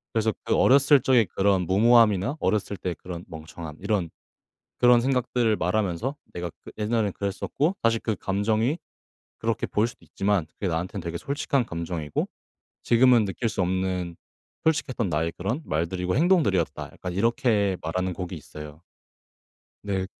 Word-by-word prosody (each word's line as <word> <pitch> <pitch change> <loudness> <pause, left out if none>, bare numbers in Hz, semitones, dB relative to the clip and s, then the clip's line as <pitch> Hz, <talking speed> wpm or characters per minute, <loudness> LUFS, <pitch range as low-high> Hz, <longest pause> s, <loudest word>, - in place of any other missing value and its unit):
그래서 110 -1 +2
그 - - +2
어렸을 140 0 +5
적의 125 -4 +4
그런 95 -1 +1
무모함이나 110 - +4
어렸을 105 -1 0
때의 90 -2 -3
그런 90 -1 -7
멍청함 80 -1 -9
이런 95 -7 0 0.7
그런 120 -1 +6
생각들을 125 -3 +1
말하면서 95 - -1 0.2
"내가 85 0 -4
그 - - -10
옛날엔 110 -1 0
그랬었고 140 - -1
사실 115 0 +3
그 110 - -1
감정이 110 - 0 0.6
그렇게 115 0 -1
보일 110 +3 +1
수도 - - -15
있지만 100 -4 0
그게 95 - -6
나한테는 90 +3 -3
되게 85 0 -3
솔직한 140 - -1
감정이고 85 -4 -3 0.6
지금은 120 -1 +5
느낄 105 +4 -2
수 110 -3 -1
없는 90 -1 -1 0.5
솔직했던 130 -8 0
나의 80 +1 0
그런 110 - -2
말들이고 90 +3 -1
행동들이었다." 145 - +2
약간 90 -1 -6
이렇게 105 -3 +1
말하는 90 +3 -2
곡이 90 +1 -5
있어요. 75 +1 -10 1.0
네. 95 -2 -1
100 Hz, 355 characters per minute, -25 LUFS, 90-120 Hz, 1.0 s, 그런